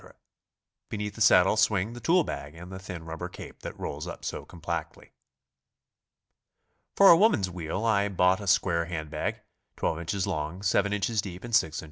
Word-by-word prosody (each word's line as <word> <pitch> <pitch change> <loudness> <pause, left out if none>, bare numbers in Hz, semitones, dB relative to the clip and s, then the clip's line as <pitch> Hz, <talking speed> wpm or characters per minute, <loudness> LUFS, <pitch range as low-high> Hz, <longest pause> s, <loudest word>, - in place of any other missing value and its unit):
Beneath 105 -1 -4
the 110 - -10
saddle 90 -1 +6
swing 110 0 +2
the 120 - -8
tool 170 +9 +3
bag 75 - -6
and 90 +3 -10
the 95 - -7
thin 90 -3 -8
rubber 80 -1 -6
cape - - -11
that - - -8
rolls - - -5
up - - -8
so - - -4
compactly. 85 0 -6 1.8
For 200 - +8
a - - +9
woman's 165 - +3
wheel 90 +5 -4
I 100 -3 +2
bought 90 0 +3
a 100 - -7
square 85 -3 +2
hand 80 -3 -5
bag, 75 - -3 0.4
12 80 0 -2
in. - - -3
long, 80 +5 -4
7 100 0 +2
in. 105 -1 -1
deep, 100 -4 -2
and 120 -1 -8
6 80 -5 +2
in. - - -2
95 Hz, 180 wpm, -28 LUFS, 85-105 Hz, 1.8 s, a